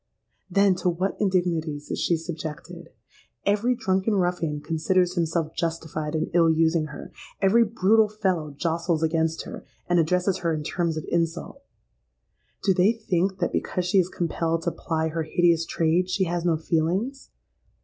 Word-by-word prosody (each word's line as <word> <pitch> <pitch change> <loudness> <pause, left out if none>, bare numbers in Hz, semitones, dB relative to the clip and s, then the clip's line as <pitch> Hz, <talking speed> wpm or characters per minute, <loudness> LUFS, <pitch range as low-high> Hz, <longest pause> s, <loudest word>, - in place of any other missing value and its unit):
Then 195 +1 +4
to 180 - +1
what 185 +3 -1
indignities 170 -6 -1
is - - -2
she 170 - +2
subjected! 165 +1 -7 0.6
Every 210 +5 +2
drunken 195 -2 0
ruffian 175 -5 0
considers 175 +4 +1
himself 165 -2 -1
justified 160 -2 -3
in 155 - -2
ill 165 -1 +5
using 160 0 +2
her: 145 - -9 0.3
every 210 +4 +5
brutal 215 0 +3
fellow 190 -7 -1
jostles 165 +2 -1
against 160 0 0
her, - - -9 0.2
and 175 -1 +3
addresses 180 +3 +1
her 165 -2 0
in 150 - -4
terms 165 0 -1
of 155 - -4
insult. 170 - -2 1.0
Do 195 - +4
they 185 +4 +4
think 190 -4 -1
that, - - -1
because 180 -2 -1
she 185 +2 +3
is 180 -1 +1
compelled 165 -1 -1
to 170 - 0
ply 160 -1 -2
her 165 +1 -2
hideous 165 +1 +2
trade, 170 +3 +1
she 190 +1 +1
has 175 -1 -2
no 165 -2 +2
feelings? 180 - -1
170 Hz, 160 wpm, -25 LUFS, 160-185 Hz, 1.0 s, ill